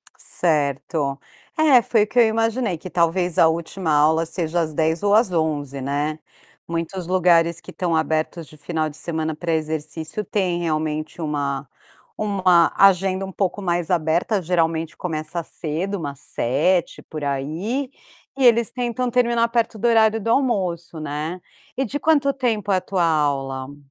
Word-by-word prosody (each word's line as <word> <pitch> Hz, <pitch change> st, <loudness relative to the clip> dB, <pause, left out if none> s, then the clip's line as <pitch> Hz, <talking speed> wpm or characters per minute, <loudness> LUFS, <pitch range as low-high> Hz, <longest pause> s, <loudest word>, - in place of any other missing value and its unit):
Certo. 145 Hz, -2 st, -1 dB, 0.4 s
É, 290 Hz, -6 st, +6 dB
foi 220 Hz, -2 st, +2 dB
o -, -, -3 dB
que 245 Hz, -, +1 dB
eu 240 Hz, -, +8 dB
imaginei, 225 Hz, -3 st, 0 dB
que 185 Hz, -, -9 dB
talvez 175 Hz, 0 st, +1 dB
a 165 Hz, -, +7 dB
última 165 Hz, +1 st, -2 dB
aula 155 Hz, +2 st, +3 dB
seja 170 Hz, 0 st, -1 dB
às 155 Hz, -1 st, -3 dB
10h 160 Hz, +1 st, 0 dB
ou 205 Hz, -, +3 dB
às 220 Hz, -4 st, +3 dB
11h, 145 Hz, -5 st, -1 dB
né. 145 Hz, +3 st, -2 dB, 0.5 s
Muitos 170 Hz, +2 st, -4 dB
lugares 170 Hz, -2 st, +3 dB
que -, -, -11 dB
estão 175 Hz, -3 st, -1 dB
abertos 160 Hz, +1 st, -1 dB
de 155 Hz, -, -15 dB
final 155 Hz, -1 st, -2 dB
de 145 Hz, -, -12 dB
semana 160 Hz, -1 st, -2 dB
para 165 Hz, +1 st, -2 dB
exercício 160 Hz, +5 st, -3 dB
têm 180 Hz, -3 st, -1 dB
realmente 155 Hz, 0 st, -2 dB
uma 140 Hz, -3 st, -2 dB, 0.5 s
uma 185 Hz, -5 st, +3 dB
agenda 190 Hz, 0 st, +4 dB
um 190 Hz, -, -5 dB
pouco 195 Hz, +1 st, -2 dB
mais 175 Hz, -2 st, -1 dB
aberta. 175 Hz, +5 st, +1 dB
Geralmente 165 Hz, -2 st, 0 dB
começa 160 Hz, 0 st, -4 dB
cedo, 170 Hz, +7 st, -3 dB
umas 140 Hz, -3 st, -6 dB
7h, 160 Hz, +11 st, 0 dB
por 155 Hz, -2 st, -7 dB
aí, 165 Hz, -, -2 dB, 0.5 s
e 270 Hz, -, 0 dB
eles 235 Hz, -1 st, +5 dB
tentam 245 Hz, 0 st, -2 dB
terminar 235 Hz, -1 st, +2 dB
perto 230 Hz, -1 st, 0 dB
do 240 Hz, -, +1 dB
horário 225 Hz, -1 st, +4 dB
do 230 Hz, -, -3 dB
almoço, 185 Hz, -, 0 dB
né. 155 Hz, +4 st, -4 dB, 0.4 s
E 270 Hz, -, +1 dB
de 290 Hz, +5 st, -4 dB
quanto 285 Hz, -2 st, +3 dB
tempo 220 Hz, -6 st, -1 dB
é 190 Hz, -, +4 dB
a -, -, -1 dB
tua 185 Hz, -3 st, -1 dB
aula? 140 Hz, -3 st, -1 dB
170 Hz, 160 wpm, -22 LUFS, 155-205 Hz, 0.5 s, eu